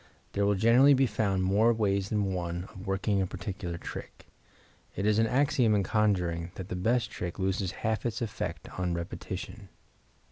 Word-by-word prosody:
There 100 0 +1
will 100 - +3
generally 120 +8 +6
be 135 +1 +4
found 100 -4 0
more 105 +5 +4
ways 100 -3 0
than 100 -3 0
one 85 -1 -3
of 95 +1 -10
working 95 +1 +1
a 95 - 0
particular 95 -3 -5
trick. - - -8 0.7
It 95 - -2
is 105 0 +3
an 115 - +3
axiom 130 -3 +3
in 100 - +2
conjuring 90 -6 0
that 95 -1 -7
the - - -3
best 110 +4 +1
trick 90 -1 -5
loses 95 -1 -1
half 110 -1 0
its 120 -1 -2
effect 115 -4 -4
on 90 -2 0
repetition. 95 +4 -6
100 Hz, 175 wpm, -29 LUFS, 95-110 Hz, 0.7 s, generally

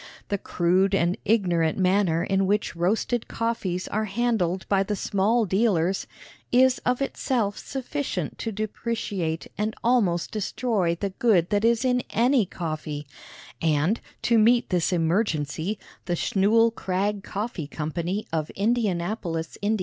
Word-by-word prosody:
The 200 - -1
crude 185 +3 +2
and 175 -1 +2
ignorant 175 -7 +2
manner 185 -3 +2
in 195 0 +1
which 205 -2 0
roasted 215 +7 0
coffees 200 -6 -2
are 215 +1 -1
handled 195 -4 0
by 195 -1 +3
the 205 +2 -1
small 210 +4 +1
dealers 190 -2 +1 0.4
is 255 +1 +4
of 250 +2 0
itself 235 -7 -1
sufficient 265 - -4
to 225 - -3
depreciate 210 -5 -3
and 215 +1 -1
almost 205 -9 +2
destroy 210 -4 0
the 195 +3 -3
good 195 -5 +2
that 205 0 +2
is 235 +2 +3
in 250 -1 +2
any 240 -2 +3
coffee; 155 -4 -5 0.6
and, 160 +6 +1 0.2
to 235 -2 +4
meet 235 +3 +4
this 175 -1 +1
emergency, 165 0 0 0.3
the 175 - 0
Schnull 220 +6 +3
Krag 195 0 -1
Coffee 200 -7 -4
Co., 155 +1 -4 0.4
of 155 -1 -1
Indianapolis, 190 -6 -1
Ind. 210 +1 +1
200 Hz, 135 wpm, -25 LUFS, 175-230 Hz, 0.6 s, is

